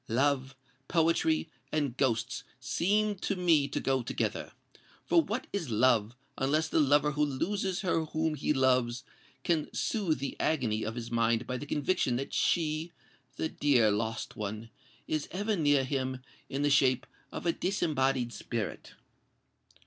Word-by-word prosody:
Love, 135 Hz, +2 st, +1 dB, 0.3 s
poetry, 165 Hz, -1 st, +2 dB, 0.2 s
and 145 Hz, -5 st, 0 dB
ghosts 125 Hz, 0 st, 0 dB, 0.2 s
seem 205 Hz, +10 st, +1 dB
to 200 Hz, +1 st, -2 dB
me 165 Hz, -6 st, +3 dB
to 140 Hz, -, -3 dB
go 135 Hz, -1 st, +1 dB
together. 120 Hz, -, -2 dB, 0.5 s
For 335 Hz, -, +5 dB
what 240 Hz, -5 st, -3 dB
is 180 Hz, -9 st, -2 dB
love, 115 Hz, 0 st, +3 dB, 0.2 s
unless 150 Hz, +4 st, +1 dB
the -, -, +1 dB
lover 145 Hz, 0 st, +4 dB
who 150 Hz, +1 st, +1 dB
loses 185 Hz, +7 st, -1 dB
her 165 Hz, -4 st, +1 dB
whom 160 Hz, 0 st, -1 dB
he 150 Hz, 0 st, -1 dB
loves, 130 Hz, -3 st, +2 dB, 0.4 s
can 160 Hz, -3 st, 0 dB
soothe 195 Hz, -9 st, 0 dB
the 135 Hz, 0 st, -4 dB
agony 120 Hz, -9 st, +1 dB
of 110 Hz, +1 st, -3 dB
his 120 Hz, -1 st, -6 dB
mind 115 Hz, 0 st, +2 dB
by 125 Hz, -, -3 dB
the 145 Hz, -, -7 dB
conviction 145 Hz, -3 st, +1 dB
that 135 Hz, +3 st, -4 dB
she—the 160 Hz, 0 st, -2 dB
dear 125 Hz, -7 st, +3 dB
lost 110 Hz, +2 st, -2 dB
one—is 110 Hz, +8 st, -6 dB
ever 205 Hz, +4 st, -1 dB
near 145 Hz, -5 st, +3 dB
him 130 Hz, -1 st, -2 dB, 0.3 s
in 140 Hz, +2 st, -2 dB
the 145 Hz, -, +2 dB
shape 130 Hz, -2 st, +4 dB, 0.3 s
of -, -, -6 dB
a 170 Hz, -, +3 dB
disembodied 135 Hz, -9 st, 0 dB
spirit?" 115 Hz, -4 st, -5 dB
140 Hz, 145 wpm, -30 LUFS, 125-160 Hz, 0.5 s, For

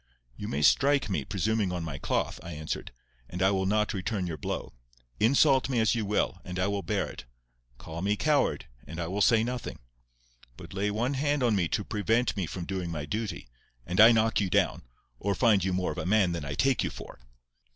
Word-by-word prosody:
"You -, -, -6 dB
may 75 Hz, +2 st, -2 dB
strike 140 Hz, -, +4 dB
me, 75 Hz, -7 st, 0 dB
presuming 105 Hz, +3 st, 0 dB
on 90 Hz, -2 st, -3 dB
my 75 Hz, -4 st, -5 dB
cloth," -, -, -1 dB
I 85 Hz, -, -7 dB
answered; 75 Hz, 0 st, -5 dB, 0.4 s
"and 90 Hz, -, -6 dB
I 95 Hz, -, +4 dB
will 95 Hz, -1 st, 0 dB
not 105 Hz, +2 st, +1 dB
return 95 Hz, 0 st, -2 dB
your 85 Hz, -2 st, -3 dB
blow. -, -, -5 dB, 0.5 s
Insult 130 Hz, +3 st, +4 dB
me 125 Hz, -3 st, +1 dB
as 110 Hz, -, +3 dB
you 110 Hz, -4 st, -2 dB
will, 100 Hz, -3 st, 0 dB
and 90 Hz, 0 st, -6 dB
I 95 Hz, -, +1 dB
will 100 Hz, 0 st, -1 dB
bear 100 Hz, -1 st, -1 dB
it. -, -, -10 dB, 0.5 s
Call 80 Hz, +5 st, -7 dB
me 100 Hz, +2 st, +1 dB
coward, 145 Hz, +8 st, +1 dB, 0.2 s
and 80 Hz, +3 st, -7 dB
I 85 Hz, -, -1 dB
will 95 Hz, +5 st, -2 dB
say 110 Hz, +1 st, +5 dB
nothing. 125 Hz, +1 st, -4 dB, 0.8 s
But -, -, -11 dB
lay 100 Hz, +2 st, 0 dB
one 115 Hz, +6 st, -1 dB
hand 145 Hz, 0 st, 0 dB
on 115 Hz, -3 st, +3 dB
me 90 Hz, -4 st, +1 dB
to 105 Hz, -, -1 dB
prevent 110 Hz, +4 st, 0 dB
me 95 Hz, -5 st, -2 dB
from 85 Hz, +1 st, -5 dB
doing 95 Hz, -2 st, -3 dB
my 75 Hz, -3 st, -4 dB
duty, 105 Hz, -, -4 dB, 0.4 s
and 90 Hz, -, +3 dB
I 115 Hz, +2 st, +10 dB
knock 110 Hz, -1 st, +2 dB
you 95 Hz, -, 0 dB
down—or 60 Hz, +6 st, -2 dB
find 105 Hz, -4 st, +3 dB
you 95 Hz, -, 0 dB
more 90 Hz, 0 st, -1 dB
of -, -, -5 dB
a -, -, -3 dB
man 100 Hz, -3 st, +3 dB
than 85 Hz, -4 st, -4 dB
I 70 Hz, 0 st, -4 dB
take 135 Hz, -1 st, +2 dB
you -, -, -1 dB
for." -, -, -10 dB
100 Hz, 215 wpm, -28 LUFS, 90-110 Hz, 0.8 s, I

